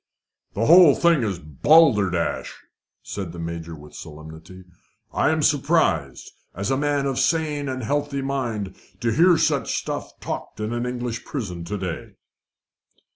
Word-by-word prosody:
"The 115 - 0
whole 170 -2 +8
thing 170 -4 +3
is 100 -5 -1
balderdash," 95 - +2 0.5
said 95 -5 -6
the - - -9
Major 85 0 -6
with 75 -1 -14
solemnity. 80 +4 -11 0.5
"I - - +2
am - - +1
surprised, - - +1 0.2
as 100 +8 -2
a - - +3
man 145 0 0
of 135 -1 -1
sane 145 0 0
and 130 -1 -4
healthy 145 +2 -1
mind, 115 -8 -3 0.2
to 120 -1 0
hear 170 +7 +5
such - - +1
stuff - - -5
talked - - -6
in 105 +2 -3
an 120 +1 -2
English 120 -1 -4
prison 100 - -5
of 85 - -7
to 105 +4 -4
day." 90 -4 -5
120 Hz, 150 wpm, -23 LUFS, 90-140 Hz, 0.5 s, whole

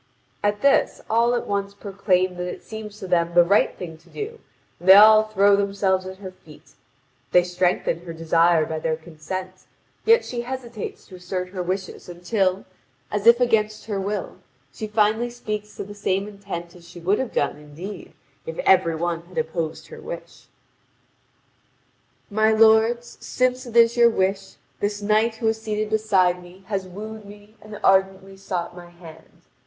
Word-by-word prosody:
At 205 0 0
this, 280 0 +3
all 235 +2 +3
at 240 - -2
once 200 0 -3
proclaim 190 -2 0
that 180 0 -3
it - - -10
seems 215 -1 -8
to 195 -3 -8
them 170 -1 +1
the 175 - +8
right 200 +4 +2
thing 165 -3 -8
to - - -23
do, 445 +2 -7 0.4
and 180 - -2
they 190 - +12
all 215 +1 +9
throw 200 -1 +4
themselves 195 -2 0
at 190 0 -8
her 190 -1 -8
feet. 150 -5 -18 0.6
They 180 - +6
strengthen 180 -1 0
her 170 0 -9
desire 165 0 +2
by 160 0 -4
their 160 0 -1
consent; 180 +4 -8 0.4
yet 460 +2 +4
she 240 -1 -4
hesitates 240 -3 -7
to 185 - -12
assert 180 0 -4
her 185 -1 -5
wishes 185 0 -4
until, 185 +2 -1 0.5
as 210 +1 -1
if 235 +1 +8
against 215 -3 +1
her 205 -2 -3
will, 205 +2 -4 0.4
she 215 - -5
finally 215 +2 +1
speaks 215 -3 -6
to - - -5
the 205 +1 -10
same 200 -1 -1
intent 195 -4 -8
as 170 -1 -16
she 175 - -11
would 190 +5 +1
have 260 - -3
done, 145 - -1
indeed, 165 +7 -9 0.3
if 160 - -6
every 180 -3 +4
one 170 0 -2
had 180 -2 -14
opposed 160 0 -3
her - - -10
wish: - - -9 1.8
"My 215 +1 +3
lords, 225 +2 +3
since 255 0 -1
it 235 - -10
is 230 0 +6
your 235 -1 +6
wish, 195 -2 -1 0.2
this 205 0 -2
knight 215 +2 +2
who 225 0 -2
is 220 0 -3
seated 215 -1 -3
beside 190 -5 +2
me 180 +2 -15
has 195 -3 -2
wooed 215 +4 -8
me 205 +1 -15
and 215 0 -10
ardently 195 0 +2
sought 185 -3 -4
my 175 -1 -11
hand. 165 -2 -16
195 Hz, 175 wpm, -23 LUFS, 180-215 Hz, 1.8 s, they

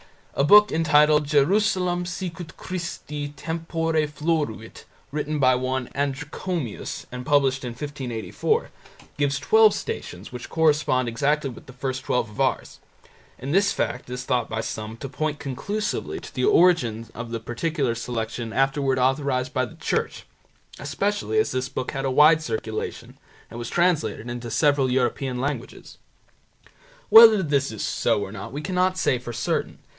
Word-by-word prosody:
A - - +1
book 210 +7 +7
entitled 150 -2 +4
"Jerusalem 180 +4 +2
sicut 175 -2 -6
Christi 170 -5 -5
tempore 165 +1 -3
floruit", 150 - -3 0.3
written 150 +1 -2
by 130 -2 +4
one 130 0 -2
Adrichomius 145 - -4
and 125 0 -6
published 135 -1 +2
in 125 - -4
1584, 130 -4 -2 0.5
gives 140 -1 +1
twelve 220 +8 +5
Stations 90 +4 -6
which 125 -1 -8
correspond 150 -5 +2
exactly 140 +4 0
with - - -13
the 135 - -11
first 130 0 -4
twelve 115 -4 -1
of 105 - -4
ours, - - -1 0.6
and 135 +4 -4
this 200 +2 +3
fact 125 - -3
is 125 0 -5
thought 125 -3 0
by 110 0 -2
some 110 0 -6
to 135 - -7
point 155 +2 -2
conclusively 200 +12 -3
to - - -11
the - - 0
origin 150 - +3
of 120 0 -7
the 115 0 -3
particular 130 +2 -1
selection 115 -1 -4
afterwards 135 0 +1
authorized 130 -1 0
by 130 - +1
the - - -12
Church, - - -2 0.5
especially 205 - -1
as 435 - +2
this 130 0 -2
book 130 -1 -4
had 135 -2 -3
a - - +1
wide 155 +4 +6
circulation 110 -5 -5 0.3
and 115 - -7
was 120 - -5
translated 155 - +1
into 120 -1 -6
several 140 +2 +2
European 125 0 0
languages. 140 +3 -5 1.1
Whether 220 -3 +9
this 140 -4 0
is 110 - -5
so - - +1
or 95 - -7
not 100 -2 -7
we 145 - -5
cannot 185 +2 0
say 125 - +1
for 120 -1 -7
certain. 120 - -2
140 Hz, 150 wpm, -24 LUFS, 125-160 Hz, 1.1 s, Whether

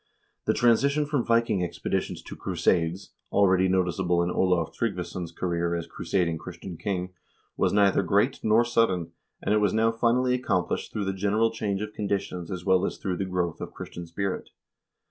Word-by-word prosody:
The - - +2
transition 140 +5 +3
from 145 -4 0
Viking 115 -5 +2
expeditions 85 - -3
to - - -8
crusades, 85 +2 0 0.2
already 95 -2 +4
noticeable 90 -1 +1
in 90 - -1
Olav 90 -4 +1
Tryggvason's 90 -5 -3
career 85 0 -1
as 85 -1 -3
crusading 85 -4 -1
Christian 90 +2 -8
king, 90 0 -3 0.4
was - - +2
neither 100 -1 +4
great 100 +8 +2
nor 110 +2 +4
sudden, 95 -8 +1 0.3
and 100 - +1
it 105 - +4
was 105 -1 +2
now 115 +1 +3
finally 120 +2 +2
accomplished 95 -8 -1
through 105 - -2
the 95 - -1
general 105 +4 +1
change 105 -3 -2
of 105 0 -6
conditions 100 -4 -3
as 90 -2 -5
well 95 -1 +4
as - - -2
through 90 -2 -3
the 95 - -1
growth 90 -3 -2
of - - -6
Christian 85 -1 -7
spirit. 95 +3 -3
95 Hz, 170 wpm, -27 LUFS, 90-110 Hz, 0.4 s, already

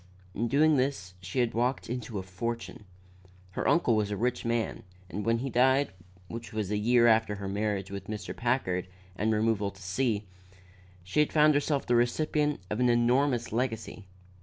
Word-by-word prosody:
In 115 +5 -1
doing 150 +4 +4
this 130 -9 -1
she 95 +8 -1
had 120 -2 0
walked 125 +3 0
into 120 -2 -4
a 95 - -3
fortune. 110 +4 -5 0.7
Her - - -2
uncle 145 -9 +3
was 105 -1 0
a 105 - -3
rich 125 +3 -1
man 115 -1 -1 0.3
and 105 - -3
when 115 +1 +2
he 135 +4 -3
died, 130 +3 +3 0.4
which 115 +3 -7
was 105 -3 -3
about - - +1
a - - -1
year 120 +2 +4
after 110 -2 +4
her 100 -1 -6
marriage 100 -1 -2
with 100 0 -6
Mr. 105 -1 -5
Packard 115 -8 0 0.3
and 110 +3 0
removal 110 -2 +1
to 100 - -15
C, 105 +3 -1 0.8
she 95 +12 +2
found 150 0 +4
herself 145 0 0
the 120 - +1
recipient 150 +4 +1
of 105 - -1
an 125 0 +3
enormous 120 +1 +2
legacy. 115 -4 -3
115 Hz, 180 wpm, -29 LUFS, 105-125 Hz, 0.8 s, doing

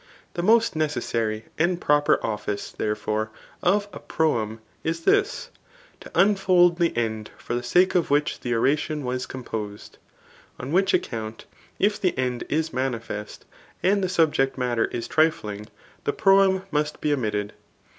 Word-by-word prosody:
The 175 - -2
most 225 +1 +4
necessary 115 -7 -1
and 175 +2 +2
proper 145 -2 +3
officci 105 -2 -3
therefore, 105 0 -1 0.3
of 200 +3 +2
a - - -7
proem 115 -9 0 0.3
is 165 +1 -2
this, 405 - +1 0.5
to - - -11
unfold 185 -3 +4
the 170 -7 +1
end 110 -2 -2
for - - -6
the 120 - 0
sake 180 +10 +3
of 175 -3 +1
which 145 +1 +1
the 120 -1 -2
oration 145 +5 +1
was 125 0 -2
composed; 110 -5 -7 0.6
on 125 +3 -5
which 190 +3 +3
account, 110 -1 -4 0.3
if 205 +1 +1
the 185 -6 +1
end 125 -1 -1
is 160 +2 -1
manifest, 115 -5 -4 0.4
and 200 +1 +3
the 185 - 0
subject 155 -7 +2
matter 125 -3 +1
is 120 - -5
trifluig, 105 -10 0 0.4
the 145 - +1
proem 195 -2 +4
must 150 0 -1
be 150 - +1
omitted. 105 -6 -2
145 Hz, 145 wpm, -24 LUFS, 115-175 Hz, 0.6 s, most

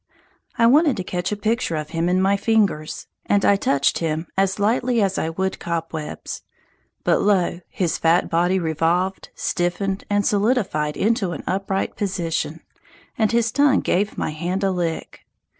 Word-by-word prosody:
I 230 - +4
wanted 290 +4 +5
to 185 - -2
catch 180 +1 -3
a - - 0
picture 220 -4 0
of 155 0 -4
him 165 +1 0
in 185 +1 +2
my 195 +1 +3
fingers, 200 -8 0 0.2
and 200 -1 +2
I 200 - +5
touched 140 -7 +1
him 160 0 -2
as 195 0 +1
lightly 235 +3 +1
as 195 -2 +1
I 160 - -1
would 190 +3 -2
cobwebs; 165 -2 -4 0.6
but - - +2
lo, 190 -4 +2
his 175 -4 -1
fat 165 +2 +3
body 175 +2 +2
revolved, 170 +3 0
stiffened 190 +2 -1
and 205 -1 +1
solidified 200 - +1
into 205 -5 +1
an 145 - -7
upright 195 +1 -2
position, 185 -5 -2 0.5
and 220 -2 +1
his 235 -1 +2
tongue 285 0 +3
gave 200 +3 0
my - - -1
hand 175 +5 -3
a 195 - +2
lick! 170 -3 -3
190 Hz, 160 wpm, -22 LUFS, 170-205 Hz, 0.6 s, wanted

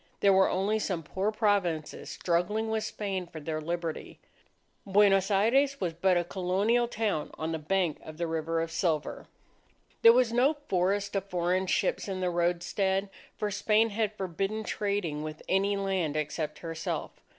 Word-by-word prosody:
There 200 -1 +5
were 190 0 +5
only 200 +4 +1
some 185 -6 -2
poor 190 +7 -1
Provinces, 200 -8 0
struggling 195 +6 0
with 220 -1 0
Spain 195 -4 -3
for 165 - -9
their 155 +1 -4
Liberty. 170 0 -4 0.6
Buenos 195 -1 +4
Aires 265 +8 +3
was 175 -3 -1
but 180 +2 +2
a 175 - +2
Colonial 195 +7 +1
town 210 -9 -1
on 160 +1 -3
the 160 - -2
bank 175 0 0
of 155 -1 -10
the 170 - -1
River 165 0 -1
of 165 0 -3
Silver. 160 -3 -1 0.7
There 230 - +9
was 240 -1 +3
no 265 +6 +3
forest 195 +3 0
of 195 -1 -1
foreign 180 +1 0
ships - - 0
in 190 -1 -3
the 180 -1 0
roadstead; 190 +3 0 0.3
for 210 -1 -2
Spain 215 +2 +2
had 215 0 -1
forbidden 195 +4 -2
trading 200 -8 -2
with 155 0 -7
any 200 +1 +2
land 190 -6 -1
except 150 0 -3
herself. 165 0 -3
190 Hz, 160 wpm, -29 LUFS, 165-205 Hz, 0.7 s, There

